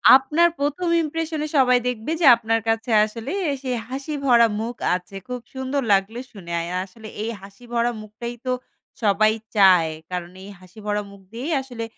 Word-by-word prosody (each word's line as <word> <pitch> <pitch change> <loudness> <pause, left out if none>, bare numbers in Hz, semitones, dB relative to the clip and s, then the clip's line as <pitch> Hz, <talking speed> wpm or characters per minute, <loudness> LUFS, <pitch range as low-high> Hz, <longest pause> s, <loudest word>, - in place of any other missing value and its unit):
আপনার 310 +6 +4
১ম 295 +5 -1 0.2
impression 315 0 -3
এ - - -3
সবাই 250 -2 +5
দেখবে 245 +4 -3
যে - - +4
আপনার 225 0 0
কাছে 225 +1 0
আসলে 225 +5 -6 0.2
এসে 265 -1 -6 0.2
হাসি 275 +4 -4
ভরা 235 -3 +6
মুখ 235 +2 -3 0.2
আছে। 185 +2 -8
খুব 250 0 -4
সুন্দর 265 +1 -2
লাগলে 195 +5 +1
শুনে। 175 -5 -10
আয় 170 +1 -5
আসলে 220 +3 -13 0.2
এই 230 - -2
হাসি 200 +4 -14
ভরা 235 0 +2
মুখটাই 225 +3 -7
তো 255 - 0 0.5
সবাই 215 +1 +4 0.2
চায়। 185 -5 +6 0.2
কারণ 180 -1 -4
এই 200 - -10
হাসি 185 +3 -16
ভরা 210 0 0
মুখ 200 -1 -14
দিয়েই 275 +8 -3
আসলে 245 -4 -7
230 Hz, 175 wpm, -23 LUFS, 205-265 Hz, 0.5 s, ভরা